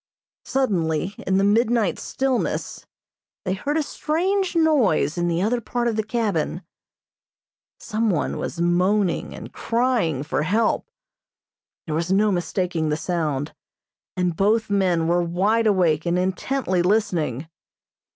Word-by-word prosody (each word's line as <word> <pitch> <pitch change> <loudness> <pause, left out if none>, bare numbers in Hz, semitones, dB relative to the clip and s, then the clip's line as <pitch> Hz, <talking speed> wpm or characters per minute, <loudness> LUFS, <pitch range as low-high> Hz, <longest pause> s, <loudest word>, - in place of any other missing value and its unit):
Suddenly, 185 - 0
in 190 0 +2
the 195 - +3
midnight 220 0 +2
stillness 265 -2 -2 0.6
they 185 - 0
heard 285 +11 -2
a 315 - +1
strange 365 +6 -1
noise 280 - +3
in 175 -1 0
the 170 +1 0
other 235 +3 0
part 240 +1 -2
of 230 - 0
the 220 - +1
cabin. 220 -1 -2 1.2
Some 225 0 -1
one 175 -6 -1
was 165 - -4
moaning 180 +2 +1
and - - -10
crying 230 - 0
for 145 -2 -1
help. 215 - +1 1.0
There 155 - -4
was 165 +3 -1
no 205 +2 +3
mistaking 175 -2 -1
the 150 - 0
sound, 155 -5 -2 0.6
and 180 -2 0
both 210 +4 +1
men 180 -5 +2
were 175 +1 +2
wide 200 +7 +1
awake 175 -6 +2
and 170 +1 +1
intently 185 +2 0
listening. 175 - 0
190 Hz, 130 wpm, -23 LUFS, 170-230 Hz, 1.2 s, the